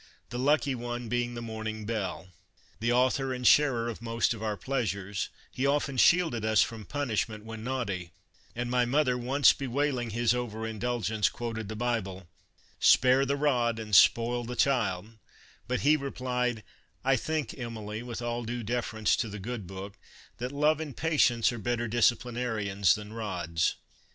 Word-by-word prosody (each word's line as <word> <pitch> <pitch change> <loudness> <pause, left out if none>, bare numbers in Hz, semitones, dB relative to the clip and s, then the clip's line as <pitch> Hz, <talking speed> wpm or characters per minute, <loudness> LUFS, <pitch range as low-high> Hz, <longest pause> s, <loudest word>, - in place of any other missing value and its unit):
" - - -39
the 120 - -4
lucky 145 +1 +2
one 120 -1 -5
being 120 +1 -1
the 120 - -5
morning 110 -1 -5
belle. 100 -4 -3 0.5
The 115 +2 +1
author 130 +2 +2
and 125 0 -6
sharer 130 -6 +5
of 115 -2 -5
most 115 0 0
of 110 - -9
our 105 -2 -2
pleasures, 100 -4 -2 0.2
he 130 +2 -1
often 140 -1 0
shielded 160 -6 +4
us 110 -1 +4
from 110 -2 -6
punishment 110 -6 -2
when 110 -1 -7
naughty, 115 -9 -3 0.5
and 120 +1 -3
my 125 -1 +3
mother 130 +1 +2
once 130 +4 +4
bewailing 135 -2 -1
his 115 +1 +2
over 115 -3 -3
indulgence, 110 -1 0
quoted 110 -3 -5
the 110 - -4
Bible: 105 -6 -2 0.3
" - - -33
Spare 130 +2 +5
the 140 - +1
rod 125 -6 +1
and 105 -2 -1
spoil 120 +5 +5
the 120 +1 -5
child," 110 -5 0 0.5
but 125 +1 -1
he 150 +2 +5
replied: 125 -5 -2 0.2
" - - -34
I 135 0 +4
think, 155 +4 -2
Emily, 110 -4 -6
with 120 -1 -6
all 120 0 -2
due 120 +1 -4
deference 110 -1 0
to 115 - -1
the 105 - -6
Good 105 -1 -5
Book, 95 +2 -8 0.4
that 125 +2 -4
love 150 +2 +2
and 150 -5 -6
patience 140 -8 +3
are 120 - -6
better 120 +2 -1
disciplinarians 115 -4 +1
than 105 0 -8
rods." 90 -7 -1
120 Hz, 170 wpm, -29 LUFS, 110-125 Hz, 0.5 s, sharer